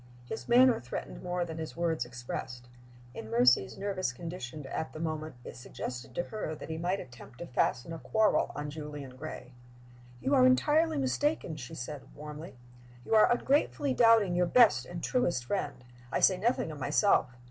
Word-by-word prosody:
His 220 - -7
manner 250 0 +6
threatened 120 - -6
more 180 0 -2
than 160 -1 -7
his 160 0 -6
words 165 -6 0
expressed. 120 0 -7 0.5
In 110 - -8
Mercy's 125 - +3
nervous 195 -7 -2
condition 150 -1 -7
at 160 +4 -4
the 155 - -7
moment, 155 -2 -4
it - - -8
suggested 125 0 -7
to 175 - 0
her 195 -6 -5
that 155 - -8
he 160 - -3
might 180 +3 0
attempt 120 -1 -12
to 175 - -6
fasten 125 +2 0
a 165 - -6
quarrel 220 +4 +2
on 145 0 -4
Julian 145 -3 -7
Gray. 130 -2 -8 0.7
"You 275 - 0
are 255 -2 +6
entirely 305 +5 +3
mistaken," 275 - 0
she 130 -5 -8
said, 140 +3 -6
warmly. 150 +1 -9 0.5
"You - - -2
are 215 +1 +6
ungratefully 275 +2 +1
doubting 225 -6 +5
your 175 0 +2
best 215 - +5
and 175 -1 -7
truest 175 - 0
friend. 140 -5 -3 0.3
I - - 0
say 190 - +5
nothing 205 -3 0
of 150 - -8
myself. 145 - +2
160 Hz, 175 wpm, -30 LUFS, 130-215 Hz, 0.7 s, manner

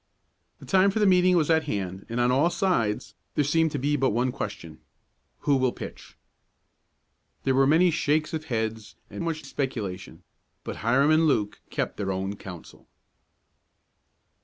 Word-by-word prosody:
The - - -13
time 190 +1 +4
for 195 - -2
the 210 - +3
meeting 180 -1 +5
was 160 -1 +2
at 160 -1 +3
hand 95 -7 -4
and 115 +1 -2
on 120 +1 +3
all 140 +7 +3
sides 115 - 0 0.2
there 150 - +3
seemed 160 +3 +2
to - - -1
be 145 +2 0
but 135 -2 +2
one 120 +4 0
question: 100 - -6 0.6
"Who 140 -2 +2
will 130 -1 +2
pitch?" - - -10 1.3
There 135 - +2
were 135 +1 +4
many 170 +4 +4
shakes 155 0 0
of 160 0 -3
heads 110 -4 -3 0.2
and - - -5
much 160 -2 -3
speculation, 105 -9 -5 0.4
but - - -6
Hiram 135 +7 +3
and 160 +1 +4
Luke 105 -8 0
kept - - -3
their 95 -2 -2
own 95 +2 -3
counsel. 90 -4 -11
135 Hz, 160 wpm, -26 LUFS, 110-160 Hz, 1.3 s, meeting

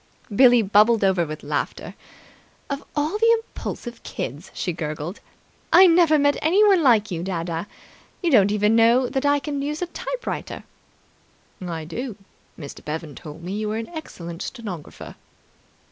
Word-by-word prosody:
Billie 245 -1 +6
bubbled 210 +2 +4
over 185 -4 +2
with 155 0 -7
laughter. - - -3 0.8
"Of 280 0 -3
all 310 +8 -1
the 460 +1 +5
impulsive 240 -1 -7
kids!" 145 +9 -6
she 180 - -3
gurgled. 155 +2 -5 0.5
"I 375 - +8
never 335 -3 +5
met 285 0 +2
anyone 385 +3 +4
like 225 -7 +3
you, 170 -2 -3
dadda! 170 -1 -3 0.6
You 340 - +2
don't 205 -6 +5
even 210 +1 +2
know 235 +3 +4
that 270 +2 -1
I 285 0 +4
can 285 -1 -4
use 300 +4 -3
a - - 0
typewriter." - - -5 1.0
"I 165 -3 -5
do. 235 +7 -5 0.4
Mr. 145 -3 -9
Bevan 155 0 -5
told 150 +5 -10
me 180 - -5
you 215 -1 -2
were 215 - -2
an 225 - -5
excellent 170 - -8
stenographer." 200 - -7
220 Hz, 150 wpm, -23 LUFS, 170-285 Hz, 1.0 s, I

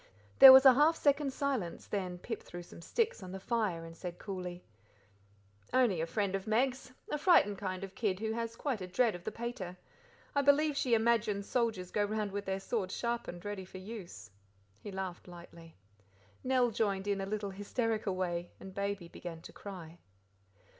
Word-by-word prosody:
There 265 - +13
was 265 +1 +9
a 265 - +10
half 300 +5 +4
second's 285 -2 +1
silence, 260 -12 -2
then 185 -3 -3
Pip 225 +5 -5
threw 175 0 -9
some 170 - -13
sticks 450 - -1
on 185 -1 -8
the 190 - -5
fire 195 -6 -1
and 165 0 -10
said 175 0 -7
coolly: 180 -3 -6 1.1
"Only 230 -10 +3
a 165 - -1
friend 200 +2 -1
of 195 +2 -3
Meg's, 255 +4 0 0.2
a 300 - -1
frightened 245 - +4
kind 185 -1 -4
of 195 -1 -7
kid 195 -3 -1
who 220 0 -2
has 230 0 -3
quite 255 -7 -2
a 185 - -5
dread 225 +4 +2
of 175 0 -9
the - - -2
pater. 215 -7 -5 0.6
I 285 - +3
believe 285 +2 +4
she 250 -4 +2
imagines 220 -3 +1
soldiers 220 -7 -1
go 210 - +1
round 210 0 -2
with 200 +1 -4
their 190 0 -2
swords 195 -2 -2
sharpened, 235 -7 -3
ready 205 -2 -4
for 185 +1 -11
use." 185 - -9 0.5
He 205 - -8
laughed 190 -2 -5
lightly. 170 -2 -13 0.7
Nell 255 -2 +2
joined 200 -3 0
in 200 -1 0
in 195 - -3
a - - -6
little 205 -1 -3
hysterical 210 0 -2
way, 175 -1 -2
and 190 - -10
Baby 200 -2 -3
began 170 -1 -8
to - - -12
cry. 175 -4 -9
200 Hz, 190 wpm, -33 LUFS, 185-235 Hz, 1.1 s, There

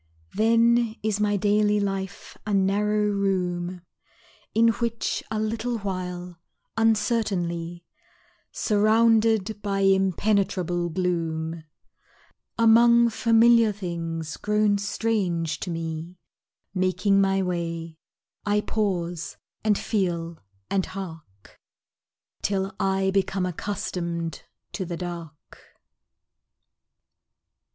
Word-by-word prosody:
Then 230 +1 +3
is 215 -1 0
my 205 -1 +2
daily 210 +1 +2
life 195 -1 -4
a 210 -1 -1
narrow 210 +2 +2
room 180 -3 -1 0.7
In 230 +1 +5
which 230 +1 -1
a 215 0 -2
little 225 +2 -1
while, 180 -3 -5 0.4
uncertainly, 195 -7 0 0.7
Surrounded 220 -1 +2
by 200 -1 -1
impenetrable 190 -2 +1
gloom, 165 -2 -2 0.9
Among 235 +1 +6
familiar 230 0 +5
things 165 -5 -5
grown 210 -1 +2
strange 190 -7 -1
to - - -5
me 165 +1 -5 0.6
Making 185 +1 +2
my 195 0 +2
way, 165 -2 -4 0.4
I 205 0 +1
pause, 180 -7 -2 0.3
and 210 -2 +3
feel, 170 -5 -2 0.3
and 190 - +1
hark, 160 - -10 0.8
Till 195 -1 -1
I 190 0 +1
become 190 -1 0
accustomed 170 -3 -3 0.3
to 195 - -3
the 175 -1 -5
dark. 170 -3 -8
195 Hz, 90 wpm, -25 LUFS, 175-215 Hz, 0.9 s, Among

